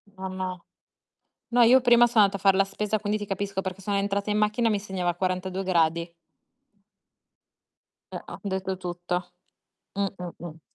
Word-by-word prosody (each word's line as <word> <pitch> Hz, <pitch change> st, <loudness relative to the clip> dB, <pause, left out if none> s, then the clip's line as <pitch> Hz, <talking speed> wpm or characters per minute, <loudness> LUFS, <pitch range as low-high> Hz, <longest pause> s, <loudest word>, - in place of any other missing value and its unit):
No, 190 Hz, 0 st, -5 dB
no. 185 Hz, -1 st, -5 dB, 0.9 s
No, 245 Hz, -, +5 dB
io 250 Hz, +3 st, +7 dB
prima 240 Hz, -1 st, +6 dB
sono 225 Hz, -3 st, +5 dB
andata 200 Hz, 0 st, 0 dB
a -, -, -19 dB
far 195 Hz, -1 st, +4 dB
la 195 Hz, -, +4 dB
spesa, 210 Hz, +2 st, -2 dB
quindi 210 Hz, +1 st, -1 dB
ti 205 Hz, -, -6 dB
capisco 195 Hz, 0 st, -2 dB
perché 190 Hz, 0 st, -6 dB
sono 200 Hz, +1 st, -1 dB
entrata 200 Hz, +1 st, -1 dB
in 210 Hz, -, +1 dB
macchina 215 Hz, +2 st, +1 dB
e -, -, +1 dB
mi 205 Hz, -1 st, 0 dB
segnava 185 Hz, -4 st, -2 dB
42 185 Hz, +1 st, -2 dB
gradi. 170 Hz, -2 st, +1 dB, 2.0 s
Eh, -, -, -6 dB
ho -, -, -9 dB
detto 190 Hz, -1 st, -2 dB
tutto. 175 Hz, 0 st, -4 dB, 0.6 s
Mh, 200 Hz, 0 st, 0 dB
mh, 175 Hz, -1 st, -8 dB
mh. 165 Hz, -1 st, -10 dB
195 Hz, 175 wpm, -26 LUFS, 185-210 Hz, 2.0 s, io